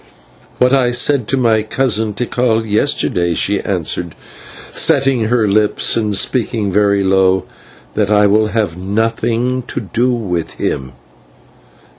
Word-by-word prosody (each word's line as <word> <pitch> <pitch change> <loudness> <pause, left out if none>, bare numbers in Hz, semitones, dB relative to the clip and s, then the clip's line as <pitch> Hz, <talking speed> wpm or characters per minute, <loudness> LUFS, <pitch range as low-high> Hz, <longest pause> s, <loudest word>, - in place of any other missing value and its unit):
"What 125 +1 +3
I 130 -3 +3
said 125 0 +1
to 135 - 0
my 115 -4 +2
cousin 110 -2 -1
Tikal 115 0 0
yesterday," 105 - 0
she 100 +4 0
answered, 85 -3 -2 0.6
setting 135 -4 +2
her 115 -1 +1
lips 105 +1 +1
and 105 -3 0
speaking 110 -2 0
very 100 0 +2
low 95 -1 +2 0.5
"that 105 -1 0
I 105 -1 +4
will 105 +2 +3
have 105 -5 -2
nothing 115 +6 -1
to - - -4
do 120 +4 -1
with 95 -9 -3
him." 65 -1 -3
110 Hz, 130 wpm, -15 LUFS, 100-120 Hz, 0.6 s, I